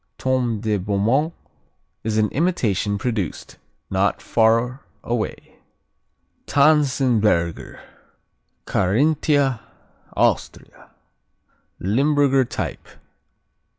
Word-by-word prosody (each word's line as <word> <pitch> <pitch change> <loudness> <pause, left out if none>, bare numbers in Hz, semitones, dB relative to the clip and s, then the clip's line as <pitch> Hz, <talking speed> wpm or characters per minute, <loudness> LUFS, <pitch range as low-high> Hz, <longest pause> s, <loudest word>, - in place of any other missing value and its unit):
Tome 125 -4 -1
de 110 -2 0
Beaumont 105 - 0 0.7
is 110 -1 -1
an 105 -1 +2
imitation 110 - 0
produced 105 -5 -4 0.3
not 95 +1 +1
far 115 +4 +1 0.2
away. 120 -2 -4 0.9
Tanzenberger 130 - +2 0.9
Carinthia, 140 - +1 0.6
Austria - - -1 0.9
Limburger 135 +5 +2
type. - - -5
120 Hz, 65 wpm, -21 LUFS, 105-140 Hz, 0.9 s, an